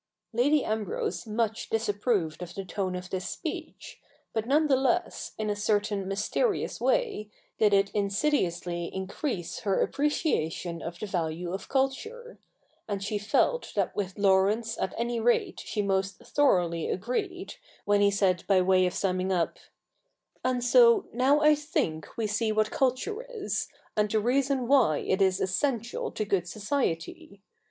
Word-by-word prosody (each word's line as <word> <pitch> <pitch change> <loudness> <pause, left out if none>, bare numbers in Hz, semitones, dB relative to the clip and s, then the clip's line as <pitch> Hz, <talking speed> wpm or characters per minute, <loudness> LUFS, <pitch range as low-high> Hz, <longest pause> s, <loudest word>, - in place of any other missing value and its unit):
Lady 275 +5 +3
Ambrose 210 -3 -2
much 220 0 -1
disapproved 205 -6 0
of 175 -1 -7
the 195 - -5
tone 185 0 -2
of 180 0 -7
this 185 -1 -3
speech; - - -7 0.3
but 220 0 -2
none 300 +4 +4
the 280 -3 +4
less, 275 +7 0
in 215 - -2
a 210 - 0
certain 205 -1 0
mysterious 210 - -1
way, 425 - 0 0.3
did 210 -1 +4
it 200 0 +3
insidiously 195 - 0
increase 190 - -4
her 200 -5 0
appreciation 180 - -1
of 170 +1 -6
the 215 - -5
value 175 -2 -3
of 195 - -6
culture; 440 - -2 0.5
and 200 -2 -3
she 210 +1 -2
felt 485 - +1
that - - 0
with 190 -1 -3
Laurence 200 +3 +2
at - - -2
any 235 0 -1
rate 240 +2 +1
she 210 -1 -2
most 195 -1 0
thoroughly 175 - +1
agreed, 360 - -3 0.3
when 205 0 +3
he 200 - +5
said 190 -3 +1
by 195 -2 +5
way 185 0 +4
of 180 - -4
summing 185 -1 0
up, 175 -3 0 0.4
' - - -43
And 255 -1 0
so 470 - +6
now 265 +5 +3
I 305 0 +6
think 290 - -2
we 225 - 0
see 215 +1 0
what 215 0 +1
culture 270 - 0 0.2
is, 400 - -2 0.3
and 210 0 +2
the 215 +1 +2
reason 260 +2 +1
why 250 - +4
it 190 +1 -1
is 190 -1 +3
essential 235 +4 -1
to 215 - -2
good 190 -3 0
society. 200 - -3
210 Hz, 155 wpm, -28 LUFS, 190-260 Hz, 0.5 s, so